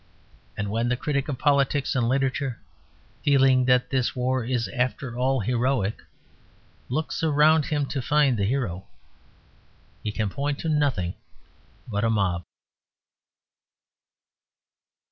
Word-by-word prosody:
And 105 Hz, -1 st, -3 dB
when 115 Hz, +2 st, 0 dB
the 125 Hz, -, 0 dB
critic 140 Hz, -2 st, -1 dB
of 135 Hz, -, -2 dB
politics 140 Hz, -1 st, +2 dB
and 120 Hz, -3 st, +1 dB
literature, 135 Hz, -1 st, -1 dB, 0.6 s
feeling 135 Hz, -2 st, +4 dB
that 125 Hz, +1 st, +2 dB
this 130 Hz, -3 st, 0 dB
war 130 Hz, 0 st, 0 dB
is 120 Hz, -2 st, -1 dB
after 125 Hz, +2 st, -2 dB
all 130 Hz, +1 st, +1 dB
heroic, 120 Hz, -1 st, 0 dB, 0.9 s
looks 155 Hz, +5 st, -2 dB
around 155 Hz, 0 st, +4 dB
him 145 Hz, -2 st, 0 dB
to 135 Hz, 0 st, -3 dB
find 145 Hz, -1 st, +3 dB
the 100 Hz, -3 st, 0 dB
hero, 105 Hz, -7 st, -2 dB, 1.1 s
he 105 Hz, -, -3 dB
can 105 Hz, 0 st, -1 dB
point 140 Hz, +3 st, -2 dB
to 165 Hz, -, -2 dB
nothing 140 Hz, -, +1 dB, 0.7 s
but 105 Hz, -2 st, -2 dB
a 115 Hz, -, +2 dB
mob. 95 Hz, -5 st, 0 dB
130 Hz, 125 wpm, -25 LUFS, 115-140 Hz, 1.1 s, feeling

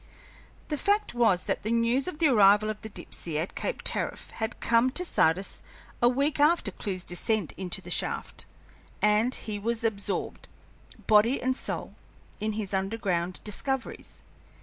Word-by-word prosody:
The 300 Hz, -2 st, -2 dB
fact 410 Hz, -, +1 dB
was 225 Hz, -7 st, +3 dB
that -, -, -2 dB
the 215 Hz, -, -3 dB
news 235 Hz, +4 st, +2 dB
of 365 Hz, -, -4 dB
the 325 Hz, -, +2 dB
arrival 210 Hz, -3 st, +5 dB
of 215 Hz, -, -9 dB
the 220 Hz, -, -7 dB
Dipsey 165 Hz, -5 st, -5 dB
at 165 Hz, +4 st, -2 dB
Cape -, -, -3 dB
Tariff -, -, -3 dB
had 220 Hz, +1 st, -4 dB
come 235 Hz, +2 st, +3 dB
to 360 Hz, +7 st, -2 dB
Sardis 185 Hz, -, +1 dB, 0.4 s
a 240 Hz, -, +6 dB
week 280 Hz, +4 st, 0 dB
after 300 Hz, -7 st, +3 dB
Clewe's 185 Hz, -1 st, -4 dB
descent 180 Hz, +1 st, 0 dB
into 185 Hz, -2 st, -3 dB
the -, -, -9 dB
shaft, -, -, -3 dB, 0.5 s
and 210 Hz, +4 st, +3 dB
he 210 Hz, -2 st, -4 dB
was 230 Hz, +2 st, -1 dB
absorbed, 205 Hz, -3 st, -2 dB, 0.6 s
body 220 Hz, +5 st, +5 dB
and 260 Hz, +1 st, 0 dB
soul, -, -, -5 dB, 0.5 s
in 215 Hz, +1 st, -1 dB
his 205 Hz, -2 st, -3 dB
underground 190 Hz, -3 st, -1 dB
discoveries. 265 Hz, +5 st, -4 dB
220 Hz, 155 wpm, -28 LUFS, 200-255 Hz, 0.6 s, a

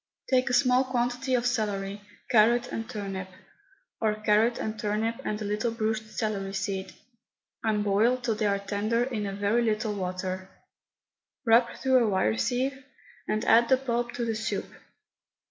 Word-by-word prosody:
Take 255 Hz, 0 st, +3 dB
a -, -, -1 dB
small 250 Hz, 0 st, +4 dB
quantity 250 Hz, +1 st, -1 dB
of 245 Hz, -1 st, 0 dB
celery, 205 Hz, -4 st, -1 dB, 0.3 s
carrot 235 Hz, +1 st, +4 dB
and 225 Hz, +1 st, -4 dB
turnip, 195 Hz, -5 st, -5 dB, 0.7 s
or 215 Hz, -2 st, +1 dB
carrot 215 Hz, +2 st, +2 dB
and 220 Hz, 0 st, -4 dB
turnip 215 Hz, +2 st, -1 dB
and 210 Hz, -, -2 dB
a 215 Hz, -, -4 dB
little 210 Hz, +3 st, 0 dB
bruised 220 Hz, -1 st, -2 dB
celery 200 Hz, -3 st, -3 dB
seed, 195 Hz, 0 st, -3 dB, 0.7 s
and 215 Hz, -2 st, +1 dB
boil 210 Hz, +5 st, +3 dB
till 240 Hz, -3 st, -1 dB
they 215 Hz, 0 st, 0 dB
are 200 Hz, 0 st, +2 dB
tender 205 Hz, +4 st, 0 dB
in 230 Hz, -5 st, -3 dB
a 195 Hz, -, -4 dB
very 205 Hz, +4 st, +1 dB
little 215 Hz, -1 st, 0 dB
water; 185 Hz, 0 st, -4 dB, 1.0 s
rub 235 Hz, +1 st, +5 dB
through 260 Hz, -2 st, +3 dB
a 220 Hz, -, +1 dB
wire 190 Hz, -, +2 dB
sieve, 260 Hz, -, -1 dB, 0.4 s
and 215 Hz, 0 st, -1 dB
add 235 Hz, +1 st, +5 dB
the 260 Hz, -, +6 dB
pulp 240 Hz, -2 st, -2 dB
to 240 Hz, -1 st, -2 dB
the 225 Hz, -, -1 dB
soup. 220 Hz, 0 st, -2 dB
220 Hz, 160 wpm, -27 LUFS, 205-240 Hz, 1.0 s, the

